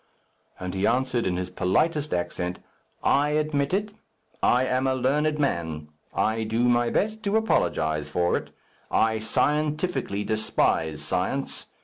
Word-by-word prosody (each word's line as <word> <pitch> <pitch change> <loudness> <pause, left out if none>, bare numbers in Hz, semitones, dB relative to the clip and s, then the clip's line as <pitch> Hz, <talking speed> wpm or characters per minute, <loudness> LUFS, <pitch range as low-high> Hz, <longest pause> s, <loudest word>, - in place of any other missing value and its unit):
And 90 0 -4
he 95 +2 +1
answered 125 -1 +1
in 90 -1 0
his 90 0 -4
politest 150 - +1
accent, 90 0 -2 0.5
"I 145 +2 +3
admit 150 -2 0
it. 205 +2 -1 0.5
I 125 +1 +4
am 130 +1 +1
a 130 - +2
learned 150 +4 +1
man. 80 - -2 0.2
I 110 +1 0
do 110 +2 0
my 120 -1 +3
best 220 +1 0
to 200 +2 +2
apologize 80 - +1
for 90 0 +1
it. - - -3 0.4
I 110 0 +2
scientifically 150 - 0
despise 80 -8 0
science. 95 - -2
120 Hz, 135 wpm, -26 LUFS, 90-150 Hz, 0.5 s, I